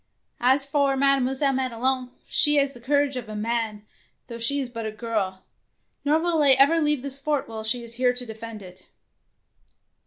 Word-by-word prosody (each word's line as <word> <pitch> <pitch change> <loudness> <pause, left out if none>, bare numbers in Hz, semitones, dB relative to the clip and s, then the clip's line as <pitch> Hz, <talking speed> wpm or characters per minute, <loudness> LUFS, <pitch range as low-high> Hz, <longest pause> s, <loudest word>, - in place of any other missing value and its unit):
As 265 +3 +2
for 280 -1 +1
Mademoiselle 275 0 +2
Madelon, 255 0 -1 0.2
she 295 0 +4
has 280 -1 +2
the 240 - -13
courage 285 +2 +1
of 230 -3 -7
a 215 - -6
man, 220 -1 -3 0.4
though 235 0 -9
she 280 +5 +2
is 265 - -3
but 230 -2 -7
a - - -4
girl, 210 -4 -3 0.6
nor 300 +2 +2
will 335 -1 0
I 280 -2 +7
ever 285 +5 +4
leave 295 -3 +1
this 275 0 +1
fort 295 -1 -1
while 220 -1 -7
she 235 +2 0
is 230 0 -5
here 250 -1 +4
to 250 0 -1
defend 220 -1 -9
it." 185 0 -15
255 Hz, 185 wpm, -24 LUFS, 230-280 Hz, 0.6 s, I